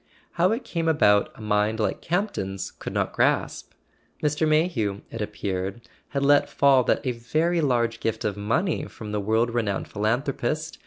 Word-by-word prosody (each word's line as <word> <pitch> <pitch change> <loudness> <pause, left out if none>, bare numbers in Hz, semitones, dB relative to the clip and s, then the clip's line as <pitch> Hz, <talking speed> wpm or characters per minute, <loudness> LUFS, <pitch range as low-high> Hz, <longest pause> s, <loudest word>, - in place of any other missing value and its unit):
How 180 +3 +2
it 230 +4 -1
came 165 -2 -2
about 105 -11 +4
a - - -13
mind 105 +1 +1
like 110 - -1
Camp 200 +5 0
ton's 95 -1 -4
could - - -7
not - - -1
grasp. - - 0 0.5
Mr. 150 +1 +1
Mayhew, 150 - +1
it 115 - -5
appeared, 100 0 -3 0.3
had 140 -1 -1
let 145 0 +4
fall 135 -2 +4
that - - +1
a 130 - +1
very 155 +9 0
large 120 -5 +1
gift 110 -1 -2
of 105 - 0
money 140 - 0
from 110 -4 -9
the 105 -1 -1
world 110 +3 +1
renowned 110 -5 -1
philanthropist. 130 +8 -2
120 Hz, 170 wpm, -25 LUFS, 105-155 Hz, 0.5 s, about